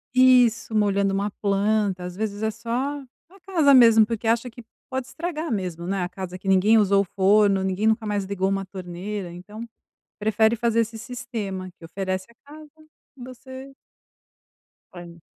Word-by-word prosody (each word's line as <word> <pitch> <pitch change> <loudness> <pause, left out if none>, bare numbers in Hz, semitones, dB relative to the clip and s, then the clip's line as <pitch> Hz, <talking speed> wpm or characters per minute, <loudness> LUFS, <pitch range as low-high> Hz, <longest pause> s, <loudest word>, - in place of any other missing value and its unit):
Isso 250 -3 +4
molhando 200 -2 +2
uma 200 +2 -1
planta 200 -2 0
às 180 0 -7
vezes 210 +1 -4
é 220 - +1
só 230 +2 -11 0.6
a 390 +2 -19
casa 320 -7 +4
mesmo 230 -4 +7
porque 225 0 -4
acha 230 +2 +1
que 240 0 -13 0.2
pode 260 -1 -4
estragar 325 0 -5
mesmo, 180 -5 -3
né, 195 -1 -1
a 175 - -3
casa 185 0 -7
que 190 - -11
ninguém 195 +4 +4
usou 200 -2 +4
o - - 0
forno, 200 0 +4
ninguém 190 +3 0
nunca 220 0 +1
mais 205 -1 -1
ligou 190 -1 -1
uma 195 0 -1
torneira 185 +1 -6
então 210 +6 -9 0.5
prefere 220 +2 +2
fazer 230 0 +1
esse 225 0 -3
sistema 220 -6 -6
que - - -15
oferece 185 +2 -4
a - - -21 0.2
casa 305 0 -12 0.5
e 255 - -12
você. 260 +2 -10 1.2
Olha. 170 -1 -11
210 Hz, 170 wpm, -24 LUFS, 190-235 Hz, 1.2 s, mesmo